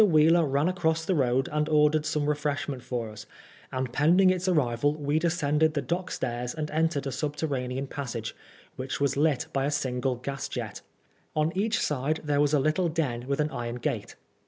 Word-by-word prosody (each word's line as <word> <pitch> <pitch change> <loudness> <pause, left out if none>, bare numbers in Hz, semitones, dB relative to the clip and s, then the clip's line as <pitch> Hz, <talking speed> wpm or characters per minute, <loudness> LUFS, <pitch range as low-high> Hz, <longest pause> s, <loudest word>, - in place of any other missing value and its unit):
Wheeler 165 -2 +5
ran 140 +3 +2
across 165 -3 0
the 190 - +1
road 130 -4 +2
and 150 +1 0
ordered 150 0 +3
some 150 -1 0
re 150 - +3
freshment 145 -2 -2
for 120 -3 -4
us, 105 - -10 0.4
and 130 -2 -3
pending 175 +7 +5
its 185 0 -1
arrival 145 -4 +2
we 150 0 0
descended 160 -2 +1
the 145 - +1
dock 180 +2 -2
stairs 120 +1 -3
and 155 -1 -3
entered 155 -2 +1
a 135 - -2
sub 145 +3 -3
terranean 135 -3 -2
passage, 120 -5 -5 0.4
which 130 +1 -4
was 140 -1 +1
lit 150 0 +2
by 135 0 +1
a - - +1
single 130 -3 -1
gas 135 +3 -5
jet. - - -5 0.5
On 155 +3 +1
each 215 +3 +1
side 150 +2 0
there 145 -1 +2
was 145 -1 +3
a - - +4
little 155 +5 +1
den 130 -7 -2
with 140 +1 -1
an 150 +1 +1
iron 120 0 -4
gate. 120 - -3
145 Hz, 195 wpm, -27 LUFS, 130-160 Hz, 0.5 s, Wheeler